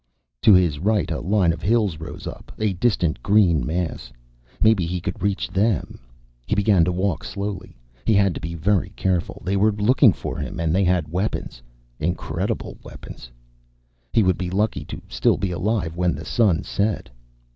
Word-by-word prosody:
To 105 Hz, -, +7 dB
his 85 Hz, -6 st, +2 dB
right 105 Hz, +1 st, +1 dB
a 80 Hz, -, -1 dB
line 95 Hz, -1 st, +2 dB
of 80 Hz, -, -8 dB
hills 100 Hz, -4 st, +1 dB
rose 80 Hz, +1 st, -8 dB
up, -, -, -8 dB
a 110 Hz, -2 st, 0 dB
distant 90 Hz, -, 0 dB
green 90 Hz, -, +3 dB
mass. 80 Hz, -4 st, -3 dB, 0.5 s
Maybe 110 Hz, -6 st, +3 dB
he 90 Hz, +1 st, -2 dB
could 90 Hz, +1 st, -5 dB
reach 100 Hz, -1 st, 0 dB
them. 100 Hz, -3 st, 0 dB, 0.5 s
He -, -, +1 dB
began 100 Hz, -3 st, +4 dB
to 90 Hz, -, 0 dB
walk 95 Hz, -1 st, -1 dB
slowly. 100 Hz, -6 st, -5 dB, 0.3 s
He 110 Hz, -, +2 dB
had 100 Hz, -2 st, +3 dB
to -, -, -7 dB
be 85 Hz, +1 st, -5 dB
very 95 Hz, +4 st, +1 dB
careful. 90 Hz, -2 st, -1 dB
They 95 Hz, +1 st, 0 dB
were 105 Hz, +2 st, +3 dB
looking 105 Hz, +3 st, +4 dB
for -, -, -5 dB
him -, -, -5 dB
and 80 Hz, -1 st, 0 dB
they 95 Hz, +1 st, +3 dB
had 90 Hz, -4 st, +1 dB
weapons. 90 Hz, -, -3 dB, 0.4 s
Incredible 85 Hz, +3 st, -3 dB
weapons. -, -, -11 dB, 0.8 s
He 110 Hz, -, +3 dB
would 95 Hz, -2 st, +1 dB
be 90 Hz, -1 st, -2 dB
lucky 105 Hz, +4 st, -1 dB
to -, -, -7 dB
still -, -, +1 dB
be 95 Hz, -, -2 dB
alive 90 Hz, -2 st, -1 dB
when 90 Hz, 0 st, +1 dB
the -, -, -8 dB
sun 100 Hz, -6 st, +2 dB
set. 105 Hz, +1 st, -1 dB
95 Hz, 180 wpm, -22 LUFS, 85-105 Hz, 0.8 s, To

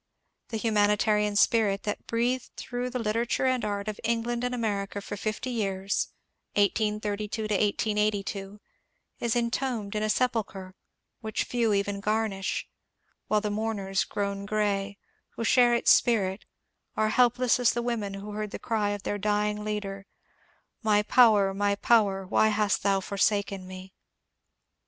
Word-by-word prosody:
The 225 Hz, -, -4 dB
humanitarian 210 Hz, -1 st, +2 dB
spirit 205 Hz, -2 st, +3 dB
that 210 Hz, -, -4 dB
breathed 240 Hz, +2 st, 0 dB
through 250 Hz, -1 st, -4 dB
the 250 Hz, -, -3 dB
literature 230 Hz, +3 st, 0 dB
and 255 Hz, -1 st, +1 dB
art 205 Hz, 0 st, -3 dB
of 215 Hz, -1 st, -4 dB
England 235 Hz, +1 st, -1 dB
and 250 Hz, 0 st, -1 dB
America 205 Hz, -4 st, -2 dB
for 200 Hz, -, -6 dB
fifty 215 Hz, +5 st, -3 dB
years 195 Hz, -4 st, -1 dB, 0.5 s
(1832 210 Hz, +1 st, 0 dB
1882) 210 Hz, -1 st, -1 dB, 0.6 s
is 235 Hz, 0 st, 0 dB
entombed 235 Hz, -3 st, -1 dB
in 210 Hz, -, 0 dB
a 215 Hz, -, 0 dB
sepulchre 210 Hz, -6 st, -1 dB, 0.5 s
which 220 Hz, -2 st, -2 dB
few 235 Hz, -3 st, 0 dB
even 200 Hz, 0 st, -1 dB
garnish, 210 Hz, -2 st, -1 dB, 0.6 s
while 210 Hz, -1 st, +2 dB
the 210 Hz, -1 st, -2 dB
mourners 205 Hz, -3 st, -1 dB
grown 200 Hz, 0 st, -3 dB
grey, 205 Hz, -1 st, -1 dB, 0.4 s
who -, -, -3 dB
shared 240 Hz, 0 st, +5 dB
its -, -, +4 dB
spirit, 200 Hz, -4 st, +2 dB, 0.5 s
are 215 Hz, 0 st, +2 dB
helpless 245 Hz, +1 st, +3 dB
as 245 Hz, -, +3 dB
the 240 Hz, -, -2 dB
women 220 Hz, -5 st, -2 dB
who 200 Hz, +2 st, -7 dB
heard 210 Hz, 0 st, -4 dB
the -, -, -6 dB
cry 215 Hz, -3 st, -1 dB
of 205 Hz, -1 st, -4 dB
their 205 Hz, -, -2 dB
dying 210 Hz, +1 st, 0 dB
leader, 200 Hz, -2 st, -4 dB, 0.7 s
^« -, -, -41 dB
My 210 Hz, -1 st, +3 dB
power, 210 Hz, -4 st, +5 dB
my 200 Hz, +1 st, +1 dB
power, 200 Hz, -3 st, +2 dB
why 215 Hz, +3 st, +3 dB
hast 210 Hz, -1 st, +1 dB
thou 195 Hz, -1 st, +2 dB
forsaken 200 Hz, -1 st, 0 dB
me 185 Hz, 0 st, -10 dB
210 Hz, 145 wpm, -27 LUFS, 200-230 Hz, 0.7 s, shared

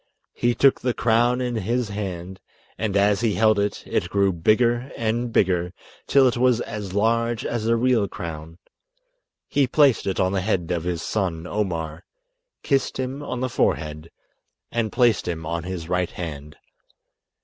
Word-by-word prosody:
He 120 Hz, 0 st, +1 dB
took 135 Hz, -1 st, +4 dB
the 125 Hz, -1 st, -1 dB
crown 120 Hz, +2 st, +2 dB
in 125 Hz, -2 st, -2 dB
his 115 Hz, +3 st, -1 dB
hand, 95 Hz, -2 st, -5 dB, 0.4 s
and 100 Hz, -1 st, -1 dB
as 100 Hz, +1 st, +3 dB
he 110 Hz, -5 st, +1 dB
held 110 Hz, +2 st, +3 dB
it, 100 Hz, 0 st, -1 dB
it 85 Hz, -, -1 dB
grew 100 Hz, 0 st, +2 dB
bigger 120 Hz, +8 st, +2 dB
and 115 Hz, +1 st, -1 dB
bigger, 90 Hz, -3 st, +1 dB, 0.3 s
till 135 Hz, -2 st, +5 dB
it 120 Hz, -, 0 dB
was 125 Hz, -1 st, +3 dB
as 105 Hz, -4 st, -6 dB
large 115 Hz, +2 st, +1 dB
as 115 Hz, -2 st, -2 dB
a 115 Hz, -, +3 dB
real 115 Hz, -3 st, +2 dB
crown. 80 Hz, -1 st, -7 dB, 0.9 s
He 140 Hz, -2 st, +2 dB
placed 140 Hz, -6 st, +3 dB
it 95 Hz, -, -1 dB
on 95 Hz, -1 st, +2 dB
the 95 Hz, -1 st, 0 dB
head 90 Hz, -4 st, -1 dB
of 85 Hz, -1 st, -2 dB
his 85 Hz, -2 st, -2 dB
son 90 Hz, -6 st, -2 dB
Omar, 85 Hz, -5 st, -3 dB, 0.6 s
kissed 135 Hz, -2 st, 0 dB
him 130 Hz, +2 st, -3 dB
on 125 Hz, -3 st, -4 dB
the 130 Hz, -, 0 dB
forehead, 75 Hz, -7 st, -1 dB, 0.6 s
and 115 Hz, -3 st, -1 dB
placed 120 Hz, -3 st, +2 dB
him 80 Hz, -2 st, -3 dB
on 85 Hz, +1 st, -3 dB
his 90 Hz, -3 st, -5 dB
right 90 Hz, 0 st, 0 dB
hand. 75 Hz, -3 st, -7 dB
105 Hz, 165 wpm, -23 LUFS, 90-120 Hz, 0.9 s, till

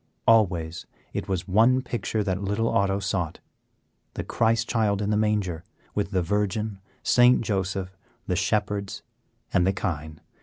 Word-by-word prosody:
Always 90 Hz, -7 st, +2 dB, 0.3 s
it -, -, -3 dB
was 90 Hz, -2 st, -2 dB
one 115 Hz, +7 st, +4 dB
picture 115 Hz, -3 st, -2 dB
that 95 Hz, -1 st, -1 dB
little 105 Hz, +3 st, 0 dB
Otto 100 Hz, 0 st, +2 dB
sought; 95 Hz, -4 st, -2 dB, 0.8 s
the -, -, -3 dB
Christ 115 Hz, 0 st, +1 dB
Child 105 Hz, -4 st, +1 dB
in 105 Hz, 0 st, -1 dB
the -, -, +2 dB
manger, 105 Hz, -6 st, 0 dB, 0.3 s
with 100 Hz, -1 st, -1 dB
the 95 Hz, -3 st, 0 dB
Virgin, 105 Hz, +2 st, -1 dB, 0.2 s
St. 125 Hz, 0 st, +5 dB
Joseph, 95 Hz, -3 st, -2 dB, 0.3 s
the 90 Hz, -, -1 dB
Shepherds, 100 Hz, +1 st, -1 dB, 0.5 s
and 90 Hz, 0 st, +3 dB
the 95 Hz, -, +3 dB
Kine. 80 Hz, -4 st, -4 dB
100 Hz, 145 wpm, -26 LUFS, 95-110 Hz, 0.8 s, St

